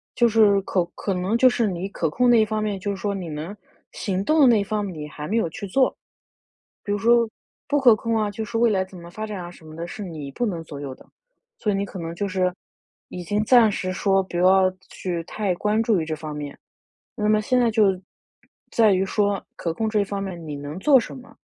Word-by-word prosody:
就 240 - +4
是 210 -3 +4
可 185 -2 0
可 195 - -2
能 185 +5 0
就 255 - +6
是 240 -3 +2
你 185 0 -3
可 165 -5 -1
控 250 +9 +2
那 235 -2 +6
一 215 - +3
方 215 0 -2
面， 205 -2 -2
就 205 +2 -4
是 200 - -4
说 200 +1 -2
你 185 -4 -5
能 155 +7 -6 0.4
行 195 -1 -2
动 310 +5 +3
的 275 - +8
那 230 -4 +5
一 - - 0
方 210 0 -2
面 190 -3 -5
你 150 0 -6
还 150 0 -7
没 225 - 0
有 225 - +1
去 200 +4 -7
做。 260 +7 +2 0.9
比 205 - -4
如 205 - +1
说 235 +2 +4 0.4
不 290 0 +2
可 245 -5 +7
控 230 +1 -1
啊， 215 -1 0
就 210 +2 -5
是 230 +1 -4
未 235 0 +4
来 190 -3 +1
怎 190 0 -13
么 170 0 -11
发 215 +5 -5
展 210 -3 -5
啊 175 - -7
什 165 -2 -15
么 155 - -11
的， 170 +1 -5
是 205 - -7
你 155 -6 -7
不 240 - -2
能 175 -6 -3
左 145 -3 -9
右 135 -2 -5
的。 - - -19 0.5
所 210 - 0
以 - - 0
你 200 +1 -1
可 195 - -9
能 165 0 -5
就 200 +4 -2
是 185 -1 0 0.6
已 180 - -6
经 205 +5 0
暂 235 -3 +6
时 185 -1 -3
说 195 0 +2
不 175 -2 -6
要 185 +1 +5 0.2
去 175 -3 -4
太 200 +1 -2
关 210 +4 +1
注 220 -5 +2
于 160 - -3
这 155 0 -3
方 155 -1 -7
面， 145 -1 -6 0.6
那 210 -1 0
么 215 0 +4
现 250 +3 +1
在 240 - +3
就 200 -4 +2 0.7
在 220 -3 +4
于 190 +1 +2
说 200 0 0
可 165 - -2
控 220 +3 -1
这 210 -2 +2
方 200 0 -4
面 180 -4 -6
你 150 - -5
能 145 +4 -7
做 275 +1 +6
什 - - -8
么。 255 - -14
200 Hz, 275 characters per minute, -23 LUFS, 175-220 Hz, 0.9 s, 的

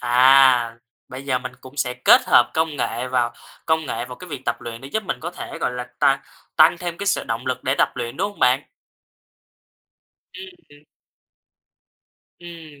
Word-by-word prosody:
À! 125 -1 +5 0.3
Bây 130 +2 -9
giờ 130 -2 0
mình 130 0 -7
cũng 130 +2 -14
sẽ 125 -3 -1
kết 125 - +6
hợp 120 - +5
công 160 -2 0
nghệ 120 -1 -2
vào 120 -2 0 0.3
công 160 -1 +1
nghệ 120 -2 -3
vào 125 0 -10
cái 180 - -12
việc 140 -5 -7
tập - - -2
luyện 115 0 -8
để 135 - -10
giúp 220 +9 -2
mình 190 - -4
có 170 - -5
thể, 175 - -8
gọi - - -1
là, 125 0 -5
ta 135 0 +3 0.3
tăng 155 +2 +5
thêm 175 -1 -5
cái 200 - -5
sự 200 - +1
động - - -4
lực - - -3
để - - +1
tập - - +4
luyện, 120 0 -5
đúng 205 - -1
hông 205 - -18
bạn? 125 +2 +3 1.7
Ưm, 380 +1 -9 0.2
ừm. 145 +1 -19 1.5
Ừm, 165 -4 -12
135 Hz, 190 wpm, -21 LUFS, 125-160 Hz, 1.7 s, kết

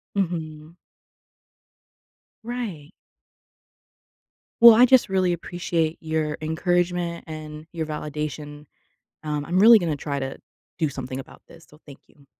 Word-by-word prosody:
Mhm. 160 -4 -4 1.7
Right. 220 -11 -6 1.7
Well, 235 -1 +10
I 245 +3 +7
just 255 -5 +4
really 185 -2 +1
appreciate 170 -1 -2
your 155 -1 -2
encouragement 175 +2 -1
and 155 -1 -9
your 160 -2 -3
validation. 150 -1 -6 0.6
Um, 150 -1 -3
I'm 180 +2 0
really 225 +3 +8
gonna 165 -6 -2
try 140 0 -4
to 135 -1 -5 0.4
do 160 -4 0
something 130 -1 -6
about 135 - -11
this, 165 0 -16
so 150 - -19
thank 140 - -13
you. 140 -1 -24
160 Hz, 120 wpm, -24 LUFS, 150-175 Hz, 1.7 s, Well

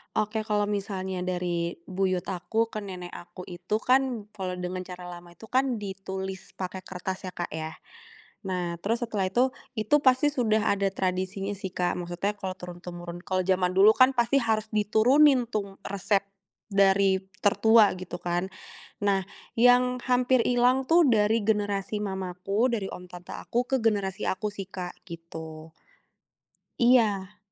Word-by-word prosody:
Oke, 215 +1 0
kalau 210 -1 +2
misalnya 195 -2 -3
dari 175 -2 -2
buyut 185 -1 -1
aku 225 +5 -1
ke 215 - -4
nenek 180 -3 -7
aku 180 +1 -10
itu 180 +3 -4
kan, 255 -3 +2
kalau 190 -3 -4
dengan 180 0 -4
cara 180 -1 -8
lama 175 0 -11
itu 220 +6 -14
kan 260 0 +2
ditulis 190 -2 -6
pakai 190 0 -5
kertas 190 +1 -5
ya, - - -5
Kak, 175 - -4
ya. 160 0 -5 0.7
Nah, 180 -2 -2
terus 220 +7 -1
setelah 215 -5 -1
itu 250 +5 +4 0.3
itu 215 +5 +2
pasti 260 0 +4
sudah 220 -6 +1
ada 200 0 +1
tradisinya 190 +1 -2
sih, 190 -1 -6
Kak, 180 -1 0
maksudnya 175 +4 -3
kalau 190 -2 -4
turun 180 -1 -9
temurun, 175 -1 -7
kalau 185 0 0
jaman 185 -1 +1
dulu 195 +3 +7
kan 255 +1 +6
pasti 240 +2 +2
harus 220 -3 0
diturunin 245 +5 +4
tuh 200 -3 -4
resep 200 0 0 0.5
dari 195 -1 +4 0.2
tertua 220 +1 +5
gitu 180 -1 -7
kan. 175 +1 -1 0.6
Nah, 200 -1 +3 0.3
yang 250 +1 +4
hampir 250 0 +3
hilang 250 +2 +2
tuh 335 0 +6
dari 220 -2 +3
generasi 205 -1 0
mamaku, 190 +3 -1
dari 205 -4 -1
om 180 - -8
tante 180 0 -10
aku, 240 +1 -2
ke 270 - +2
generasi 205 -5 0
aku 210 +3 -1
sih 200 -1 -7
Kak, 180 -1 -7
gitu. 160 -2 -9 1.1
Iya. 210 -5 +3
195 Hz, 155 wpm, -27 LUFS, 180-225 Hz, 1.1 s, dulu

